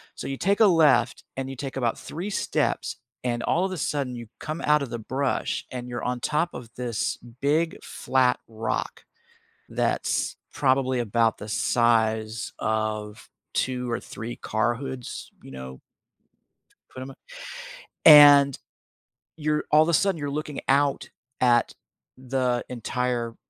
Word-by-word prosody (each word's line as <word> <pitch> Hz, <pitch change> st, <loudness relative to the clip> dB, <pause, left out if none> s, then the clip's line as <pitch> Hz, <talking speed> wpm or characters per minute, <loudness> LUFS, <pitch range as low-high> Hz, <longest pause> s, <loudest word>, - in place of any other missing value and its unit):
So -, -, -6 dB
you 135 Hz, 0 st, -3 dB
take 200 Hz, +6 st, +1 dB
a 220 Hz, -, +7 dB
left, 145 Hz, -9 st, +4 dB
and 135 Hz, 0 st, -4 dB
you 135 Hz, -, -6 dB
take 135 Hz, +1 st, -6 dB
about 120 Hz, -3 st, 0 dB
3 175 Hz, +6 st, -6 dB
steps, 205 Hz, -, -1 dB, 0.3 s
and 120 Hz, -1 st, -1 dB
all 180 Hz, +3 st, +1 dB
of 190 Hz, -, -3 dB
a 185 Hz, -, -4 dB
sudden, 140 Hz, -5 st, -2 dB
you 120 Hz, -1 st, -8 dB
come 155 Hz, +2 st, -5 dB
out 150 Hz, 0 st, +3 dB
of 135 Hz, -, -6 dB
the 120 Hz, -, -4 dB
brush, 130 Hz, +4 st, -2 dB
and 125 Hz, -1 st, -6 dB
you're 120 Hz, 0 st, -5 dB
on 125 Hz, 0 st, -1 dB
top 155 Hz, +7 st, 0 dB
of 125 Hz, -2 st, -8 dB
this 120 Hz, -3 st, -2 dB
big 145 Hz, +7 st, -1 dB
flat 130 Hz, -1 st, +1 dB
rock 110 Hz, 0 st, -4 dB, 0.7 s
that's -, -, 0 dB, 0.2 s
probably 130 Hz, -1 st, +2 dB
about 115 Hz, 0 st, +1 dB
the 105 Hz, -, -8 dB
size 110 Hz, 0 st, +1 dB
of 110 Hz, -1 st, -3 dB, 0.2 s
2 125 Hz, -1 st, -1 dB
or 115 Hz, -, -1 dB
3 115 Hz, +2 st, -7 dB
car 115 Hz, +2 st, 0 dB
hoods, 130 Hz, -1 st, -7 dB
you -, -, -12 dB
know 65 Hz, 0 st, -9 dB, 1.1 s
put 130 Hz, -, -8 dB
‘em 130 Hz, -, -7 dB
a -, -, -15 dB, 0.9 s
And 145 Hz, -3 st, +9 dB, 0.8 s
you're 150 Hz, -1 st, 0 dB
all 155 Hz, +1 st, +6 dB
the 170 Hz, -, 0 dB
sudden, 195 Hz, +2 st, +2 dB
you're 145 Hz, -1 st, -3 dB
looking 150 Hz, 0 st, -4 dB
out 140 Hz, +1 st, +2 dB, 0.3 s
at 120 Hz, -2 st, +3 dB, 0.4 s
the 130 Hz, -1 st, -1 dB
entire 120 Hz, -1 st, -2 dB
125 Hz, 150 wpm, -25 LUFS, 115-145 Hz, 1.1 s, And